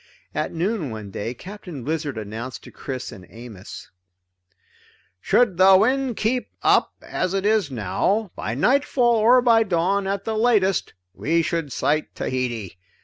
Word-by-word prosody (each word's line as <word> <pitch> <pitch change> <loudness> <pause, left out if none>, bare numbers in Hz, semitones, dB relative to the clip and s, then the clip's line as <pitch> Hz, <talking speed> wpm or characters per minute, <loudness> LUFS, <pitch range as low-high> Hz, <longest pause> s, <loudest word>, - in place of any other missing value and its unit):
At - - -2
noon 175 - -1
one 110 -3 -7
day 115 +5 -4
Captain 180 - -9
Blizzard 150 -3 -3
announced 110 +4 -6
to - - -12
Chris 130 -2 -6
and 90 -3 -12
Amos: 115 -5 -11 1.3
"Should 220 - +2
the 190 +1 +7
wind 255 +3 +1
keep 245 +3 0 0.2
up - - +3
as 185 +1 -2
it 195 0 -1
is 210 -6 +2
now, 170 - -1
by 110 - -4
nightfall 245 - +3
or 240 +3 +5
by 230 -2 +5
dawn 190 0 +1
at 195 0 -2
the 220 +1 -2
latest, 215 -6 +2 0.2
we 165 +9 +1
should 165 -4 -2
sight 150 +4 -1
Tahiti. 120 -8 -3
175 Hz, 145 wpm, -23 LUFS, -, 1.3 s, the